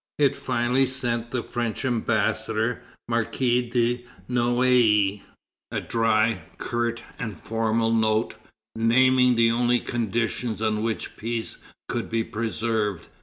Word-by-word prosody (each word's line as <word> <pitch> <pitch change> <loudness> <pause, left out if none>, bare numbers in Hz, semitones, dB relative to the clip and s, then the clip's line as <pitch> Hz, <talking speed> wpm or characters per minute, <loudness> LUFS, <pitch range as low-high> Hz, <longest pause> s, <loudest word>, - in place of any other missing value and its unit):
It 140 -3 +3
finally 125 +3 +1
sent 120 -3 -1
the 125 -1 -2
French 120 +1 -3
Ambassador, 115 -1 0 0.3
Marquis 120 +1 0
de 120 0 +1 0.2
Noailles, 120 -5 +3 0.5
a - - -1
dry, 110 -2 +1 0.2
curt, 120 -1 -2 0.2
and 110 -4 -4
formal 115 0 0
note, 110 -1 +1 0.4
naming 125 +2 +4
the 115 0 +4
only 120 +1 +2
conditions 115 -1 -2
on 110 -1 0
which 115 0 -3
peace 115 0 -4 0.3
could - - -3
be 115 0 0
preserved. 110 -4 -2
115 Hz, 115 wpm, -25 LUFS, 110-120 Hz, 0.5 s, naming